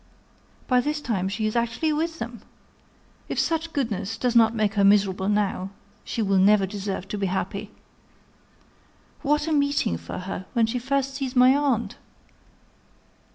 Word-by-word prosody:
By 250 -1 +4
this 300 +3 -2
time 195 -9 -2
she 215 +2 -2
is 215 - -1
actually 235 +7 0
with 325 +2 -2
them! 235 -5 -6 0.9
If - - -3
such 325 0 0
goodness 225 -6 -2
does 245 +1 0
not 225 0 +5
make 215 -1 +1
her 205 -2 +2
miserable 195 -1 +3
now, 205 -2 0 0.3
she 230 - -2
will 195 -1 +2
never 200 +1 +5
deserve 195 -1 -5
to 210 - -4
be 195 - 0
happy! 195 +2 -3 1.5
What 300 +1 +1
a - - -1
meeting 285 - +1
for - - -7
her, 185 0 -6
when 235 -3 +3
she 235 +3 -2
first 275 +2 -1
sees 270 -1 -4
my 255 +1 +6
aunt!" 275 -5 0
225 Hz, 155 wpm, -25 LUFS, 200-275 Hz, 1.5 s, my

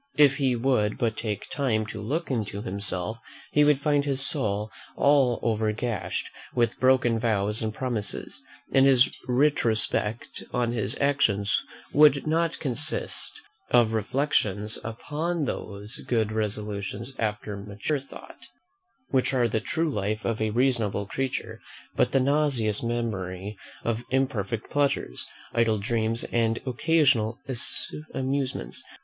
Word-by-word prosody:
If 140 -2 +6
he 130 -3 +2
would 115 -4 +1
but 115 -2 0
take 105 -3 -3
time 115 -6 0
to 105 - -7
look 145 +9 -2
into 105 -4 -2
himself, 100 +1 -1 0.3
he 150 - +5
would 145 -2 +4
find 145 -1 +2
his 140 -2 -1
soul 110 -7 -1 0.2
all 140 -4 +4
over 110 -2 +1
gashed 115 -2 -3 0.3
with 120 -2 +1
broken 130 -3 +3
vows 105 -1 +1
and 110 -1 -1
promises; 115 -3 -3 0.3
and 135 0 +5
his 130 -2 +5
retrospect 120 -4 +1
on 120 -1 0
his 110 -2 -1
actions 115 -8 +2 0.3
would 145 -1 +6
not 165 +1 +1
consist 130 -6 +1 0.3
of 120 -3 +4
reflections 110 -3 0
upon 150 +8 -2
those 105 -1 -5
good 110 -3 +1
resolutions 105 +2 -3
after 105 -1 -2
mature 105 +8 -3
thought, 135 - -13 0.6
which 130 0 +1
are 120 -2 +3
the 110 -1 -1
true 160 +6 -1
life 105 -1 -2
of 110 -1 -1
a 110 - +1
reasonable 115 -4 +1
creature, 130 +6 -3 0.4
but - - +2
the 135 - +3
nauseous 135 -6 +1
memory 105 -5 -3 0.3
of 115 0 -1
imperfect 115 -5 -1
pleasures, 140 - +1 0.3
idle 115 -2 +2
dreams, 115 +1 0
and 115 -1 +2
occasional 130 -4 +2 0.8
amusements. 130 - -2
115 Hz, 130 wpm, -26 LUFS, 105-135 Hz, 0.8 s, If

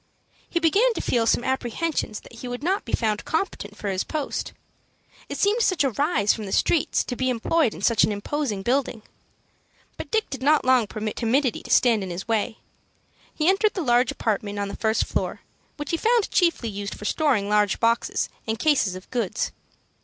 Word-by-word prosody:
He 340 - 0
began 415 +9 +3
to - - -2
feel 230 -2 +1
some 240 - +2
apprehensions 260 -2 -2
that - - -16
he 250 - -6
would 245 +3 -5
not 380 +4 0
be 230 - -7
found 215 -3 0
competent 265 - -3
for 210 - -5
his 190 -1 -1
post. 305 -3 -3 0.8
It - - -4
seemed 420 +4 +2
such 370 -8 +2
a 270 - +1
rise 235 - +2
from 220 - -6
the - - -6
streets 325 - +2
to 250 - -5
be 260 +1 0
employed 255 +2 +1
in 175 - -9
such 230 -1 +4
an - - +2
imposing 210 0 -2
building. 245 -2 0 0.9
But - - -7
Dick 440 -1 +1
did 270 -2 -5
not 295 +1 +3
long 255 -4 +4
permit 215 0 -4
timidity 250 +1 +1
to - - -12
stand 230 -4 +4
in 190 - -5
his 175 +4 -6
way. 225 0 0 0.7
He 310 - -1
entered 395 +3 +3
the 365 - -2
large 245 0 +3
apartment 205 -5 -2
on 200 0 -2
the - - -6
first 220 0 +1
floor, - - -3 0.4
which 295 -1 -5
he 330 - +1
found 460 +2 +2
chiefly 335 - +2
used 200 0 -5
for 210 - -9
storing 255 -7 +1
large 210 -1 +2
boxes 230 0 +1 0.2
and 220 0 -1
cases 260 -10 +2
of 185 - -10
goods. 235 -7 -1
245 Hz, 200 wpm, -24 LUFS, 210-305 Hz, 0.9 s, such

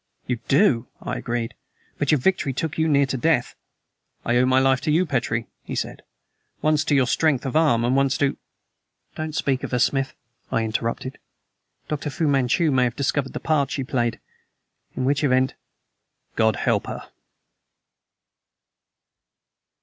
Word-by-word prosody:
"You 125 -2 -2
do," 135 - +3
I - - -4
agreed; 120 -1 -3 0.5
"but 145 - 0
your 150 - +5
victory 140 -1 +1
took 160 +3 -3
you 160 - +3
near 140 -2 +4
to 135 0 -3
death." 145 -2 +1 0.7
"I 120 - +1
owe 125 +1 +4
my 130 0 +3
life 130 0 +3
to 155 - 0
you, 170 +4 +3
Petrie," 120 -6 -1 0.2
he - - -6
said. - - -4 0.6
"Once 155 0 +2
to 150 - +2
your 135 -2 +4
strength 140 +1 +1
of 135 - -3
arm, 145 -8 +3
and 125 +2 +2
once 135 -1 +2
to 140 -1 +1 0.4
" - - -47
"Don't 155 -1 -4
speak 135 -3 0
of - - -4
her, 125 - 0
Smith," 135 +2 +1 0.4
I 115 - +1
interrupted. 115 +4 -3 0.7
"Dr. 150 0 -3
Fu 155 +3 -1
Manchu 140 +3 +2
may 130 -2 +3
have 120 -1 -2
discovered 140 -1 -1
the - - -4
part 145 -4 +1
she 135 - -2
played! 120 -3 -1 0.8
In 130 - -1
which 140 +3 +1
event 130 -2 +2 0.4
" - - -49
"God 110 -2 +3
help - - 0
her!" - - -7
135 Hz, 165 wpm, -23 LUFS, 125-150 Hz, 0.8 s, your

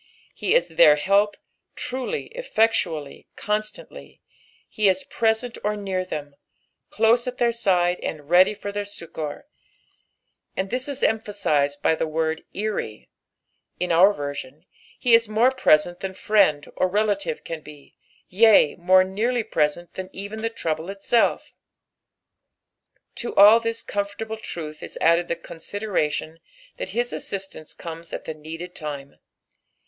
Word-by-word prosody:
He - - 0
is - - +3
their 150 - +6
help, 200 +6 +2 0.4
trulj, 350 - -4
enectaallf, 220 - 0
constantly; 215 - -4 0.5
he 210 -2 +2
is 190 0 0
present 225 +1 -1
or 210 +1 0
near 190 -2 -2
them, 150 -5 -6 0.6
cloae 230 +3 +3
at 250 0 -4
their 235 -1 +2
side 180 -6 +1
and 155 - -4
readj 180 +7 +4
for 205 - -5
their 205 0 -3
succour, 165 - -6 1.1
and 190 0 -2
this 255 +2 -1
is 280 -1 -5
emphaaized 155 -10 0
by - - +4
the 160 - -1
word 160 0 -1
" - - -40 0.2
wry" 110 - -6 0.7
in 180 -1 -1
our 180 +5 +6
version, 145 -1 -6 0.3
he 245 - +2
u 230 - +9
more 225 +4 +4
preseot 175 -8 +3
than 190 -1 -4
fiiend 190 -8 +2
or 185 - +2
relative 200 -4 -1
can 165 -1 -6
be, 150 -2 -15 0.3
yea, 210 -5 +5
more 185 +2 +5
nearly 225 +6 -1
preseot 155 0 -1
than 185 0 -6
even 200 +3 -7
Uie 225 +1 -3
trouble 160 +2 -3
itself.. 200 +4 0 1.6
To 240 - -5
all 210 +3 +8
this 230 0 -3
comfortable 205 +2 -4
truth 155 -7 -7
is - - -8
added 170 +1 +3
the 170 - -1
consideiation 165 -2 -3 0.4
that - - -5
his 240 +1 -1
asBistance 190 -5 -6
comes 165 0 -8
at - - -6
the 160 - -4
needed 165 +4 -8
time. 145 -3 -7
190 Hz, 140 wpm, -24 LUFS, 160-220 Hz, 1.6 s, u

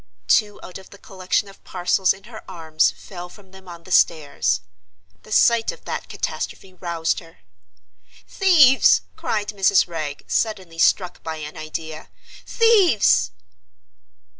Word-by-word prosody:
Two 205 - +2
out 185 - -9
of 190 - -16
the 200 - -14
collection 190 +1 -2
of 195 - -16
parcels 185 +1 +1
in 195 - -6
her 225 -2 -11
arms 160 -4 +1
fell 180 -2 -10
from 190 0 -18
them 190 -1 -16
on 170 -1 -11
the 185 - -13
stairs. 150 - +2 0.6
The 215 - -17
sight 230 +1 +3
of - - -15
that - - -5
catastrophe 190 - -5
roused 170 -3 -2
her. 165 -2 -17 0.9
"Thieves!" 315 -9 +5
cried 210 -1 -3
Mrs. 195 -2 +3
Wragge, 155 -4 -6
suddenly 190 -7 -2
struck 180 +1 +1
by 160 0 -5
an 150 -1 -8
idea. 155 0 -7 0.4
"Thieves!" 400 - +3
185 Hz, 140 wpm, -21 LUFS, 165-205 Hz, 0.9 s, Thieves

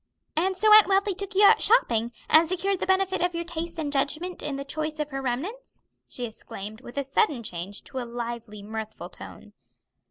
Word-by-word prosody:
"And 370 +4 +1
so 430 +2 +6
Aunt 430 -1 +9
Wealthy 395 +1 +2
took 395 +1 -6
you 405 - +5
out 405 - +7
shopping, 235 - +3 0.2
and 320 +1 +5
secured 380 +1 0
the - - -2
benefit 380 -1 +2
of 355 0 0
your 340 - -2
taste 335 0 -5
and 300 -3 -3
judgment 310 +6 -1
in 285 - -3
the 275 0 -5
choice 310 +2 -3
of 300 -1 -3
her 270 0 -3
remnants?" 315 - -5 0.2
she 245 - -5
exclaimed, 220 -1 -9
with 245 +1 -12
a 280 - +1
sudden 275 - +1
change 190 0 -5
to 265 - -5
a - - -3
lively, 235 -3 -6
mirthful 220 +1 -6
tone. - - -12
300 Hz, 200 wpm, -26 LUFS, 240-375 Hz, 0.2 s, Aunt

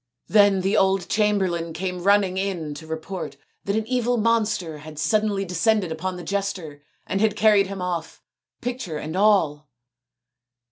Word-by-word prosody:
Then 205 -2 +5
the 195 +2 +1
old 190 -1 +2
chamberlain 190 -6 +1
came 180 +1 -4
running 200 -1 +3
in 185 -6 -2
to 160 +2 -10
report 160 +4 -5 0.3
that 200 - 0
an 220 0 0
evil 245 0 0
monster 215 -8 0
had 155 0 -11
suddenly 210 +3 +1
descended 185 +1 +1
upon 180 +3 -3
the 175 - -7
jester 180 -6 -3 0.2
and 195 - -1
had 215 -2 +2
carried 210 -3 +4
him 195 -1 -5
off, 175 -3 -4 0.4
picture 245 -10 -4
and 155 +3 -5
all. 165 -8 +2
190 Hz, 150 wpm, -24 LUFS, 165-210 Hz, 0.4 s, Then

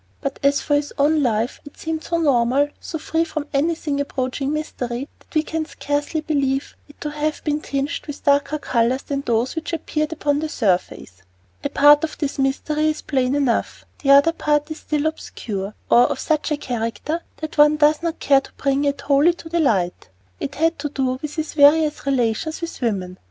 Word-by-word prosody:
But 275 -2 -4
as 280 +1 +3
for 290 - -1
his 290 0 +1
own 300 +2 +3
life, 230 -2 0
it 290 - -14
seemed 320 -1 -4
so 340 - -1
normal, 280 -2 +2
so 325 - -5
free 320 +1 0
from 310 -3 -4
anything 295 0 0
approaching 270 0 -2
mystery, 265 -4 -3
that - - -27
we 310 - +3
can 320 0 -2
scarcely 290 +1 -2
believe 280 -3 -1
it 290 - -18
to 300 - -3
have 300 +1 -2
been 300 -1 -1
tinged 280 +4 -3
with 290 - -7
darker 285 +1 +2
colors 250 -2 0
than 280 -1 -3
those 235 +1 0
which 320 +1 -4
appeared 305 -1 -2
upon 290 -2 0
the 315 0 -3
surface. 180 - -1 0.4
A - - -1
part 295 +1 +6
of 320 - -3
this 285 -2 -3
mystery 300 +3 0
is 310 - -3
plain 260 -1 0
enough. 275 -5 0 0.2
The 275 - -1
other 280 +4 +7
part 295 -1 0
is 315 - -5
still 300 -1 -2
obscure 210 -10 -4
or 240 - +6
of - - -2
such 310 0 0
a 300 - +1
character 245 +5 -3 0.2
that 315 -1 -6
one 295 +1 +7
does 300 +1 +4
not 335 -1 -3
care 275 -1 +4
to - - -15
bring 275 +1 0
it 280 0 -1
wholly 290 +5 +3
to 325 - -11
the 340 +1 0
light. 190 - 0 0.3
It 135 - -4
had 330 +1 +1
to 295 0 -3
do 260 -2 -1
with 300 -1 -5
his 315 -2 -3
various 300 0 +4
relations 260 +3 0
with 335 -4 -6
women. 185 -6 -2
290 Hz, 200 wpm, -21 LUFS, 265-310 Hz, 0.4 s, other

